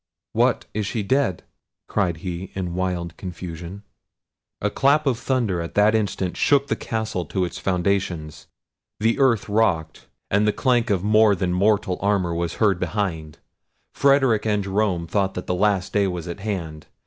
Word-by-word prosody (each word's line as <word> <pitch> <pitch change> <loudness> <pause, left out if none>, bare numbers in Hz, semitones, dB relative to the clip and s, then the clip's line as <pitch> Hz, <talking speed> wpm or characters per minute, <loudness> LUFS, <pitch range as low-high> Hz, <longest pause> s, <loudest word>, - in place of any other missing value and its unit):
"What! - - +2
is 105 -2 -2
she 110 -1 -2
dead?" 115 -4 0 0.4
cried 90 -6 0
he 90 +1 -4
in 90 -3 -3
wild 90 -2 -2
confusion. 90 +1 -7 0.8
A - - -1
clap 145 +3 +3
of 125 -4 +1
thunder 115 -10 0
at 85 - -7
that 105 +1 +4
instant 100 -4 -1
shook 140 -1 +2
the - - +1
castle 110 -5 -3
to 90 +4 -1
its 85 - -6
foundations; 90 -4 -1 0.5
the 115 +2 +1
earth 125 -6 +3
rocked, 95 -7 0 0.2
and 105 +2 +3
the 105 - +2
clank 120 -3 +1
of 95 -3 +1
more 105 0 +5
than 90 -2 -1
mortal 100 0 +1
armour 100 -4 +1
was 85 0 -2
heard 100 -5 +2
behind. 80 -9 -3 0.6
Frederic 135 -6 +3
and 105 -2 0
Jerome 95 -3 0
thought 95 +3 -1
the 90 - -4
last 95 0 +1
day 100 -1 +3
was 90 -2 -4
at 85 +2 -6
hand. 85 -7 -5
100 Hz, 160 wpm, -23 LUFS, 90-110 Hz, 0.8 s, more